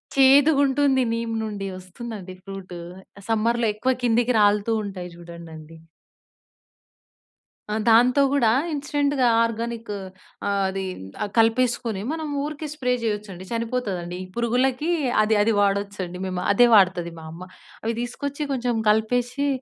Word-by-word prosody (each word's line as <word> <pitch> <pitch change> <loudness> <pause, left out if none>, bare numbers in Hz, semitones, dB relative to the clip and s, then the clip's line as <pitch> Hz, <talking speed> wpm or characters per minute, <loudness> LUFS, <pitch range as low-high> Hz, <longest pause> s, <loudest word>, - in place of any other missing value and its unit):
చేదుగుంటుంది 275 0 +5
neem 230 0 -2
నుండి 205 -2 -4
వస్తుందండి 185 0 -8
fruit. 195 -2 -8 0.4
ఆహ్, 200 - -15
సమ్మర్‌లో 230 +1 +1
ఎక్కువ 255 +5 0
కిందికి 240 +1 +2
రాలుతూ 205 +2 +3
ఉంటాయి 180 -3 -6
చూడండండీ. 165 -2 -11 1.9
ఆ! - - 0
దాంతో 245 +5 +5
గూడా, 235 -6 +3 0.2
ఇన్‌స్టెంట్‌గా 285 -2 0 0.2
ఆర్గానికు 230 -1 -3 0.5
ఆహ్, 200 -1 +1
అదీ 190 0 -3 0.4
ఆహ్, 205 - -4
కలిపేసుకొని 230 -2 +2
మనం 315 -1 -4 0.2
ఊరికే 305 +1 -5
స్ప్రే 250 -4 -1
చేయొచ్చండి, 210 -4 -3
చనిపోతదండి. 225 -7 -3
ఈ - - -10
పురుగులకి 250 +6 +1 0.3
అది 215 0 +2
అది 225 +2 +2
వాడొచ్చండి 200 -3 -1
మేము. 185 -1 -3
అదే 240 +4 +6
వాడుతది 180 -4 +3
మా 160 - -11
అమ్మ, 170 +3 -9 0.4
అవి 225 0 -1
తీసుకొచ్చి 280 +4 -5
కొంచెం 245 -2 -1
కలిపేషి 245 +6 +1
225 Hz, 120 wpm, -23 LUFS, 195-250 Hz, 1.9 s, అదే